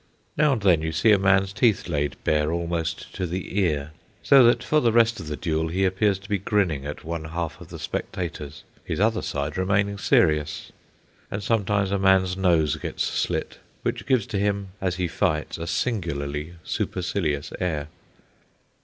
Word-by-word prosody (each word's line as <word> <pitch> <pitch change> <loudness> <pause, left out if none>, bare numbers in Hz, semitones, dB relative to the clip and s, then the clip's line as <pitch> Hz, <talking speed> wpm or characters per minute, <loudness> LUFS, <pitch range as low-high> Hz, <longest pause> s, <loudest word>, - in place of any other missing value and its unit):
Now 150 -1 +4
and 110 -6 -3
then 90 -5 +4
you 80 0 -2
see 85 +8 +3
a 105 - +5
man's 95 0 +3
teeth 110 -2 +2
laid 75 -4 -1
bare 75 0 +1
almost 85 -1 -3
to 90 - -3
the 90 +3 -3
ear, 75 -6 0 0.3
so 135 -2 +7
that 120 - +4
for 155 - +3
the 120 -5 +3
rest 115 0 +3
of 80 - -7
the 75 -1 -4
duel 80 +3 -1
he 95 +4 0
appears 95 +1 +2
to 95 0 -14
be 100 -2 0
grinning 90 -8 0
at 75 - -6
one 80 -1 -4
half 80 -1 -4
of - - -10
the - - -9
spectators, 75 -5 -5 0.2
his - - -3
other 110 +2 +2
side, 75 +4 -3
remaining 100 +1 +1
serious; 75 -4 +1 0.6
and 100 +1 -4
sometimes 100 -2 +1
a 100 - +1
man's 95 -1 +3
nose 85 -6 +2
gets - - -3
slit, - - -2 0.2
which - - -3
gives 130 -7 +2
to 100 - -3
him 100 -1 -1
as 90 -2 0
he 90 -1 -1
fights 80 -3 -1
a 85 - -4
singularly 80 - -2
supercilious 85 -6 -2
air. 75 -5 -2
90 Hz, 180 wpm, -24 LUFS, 80-100 Hz, 0.6 s, so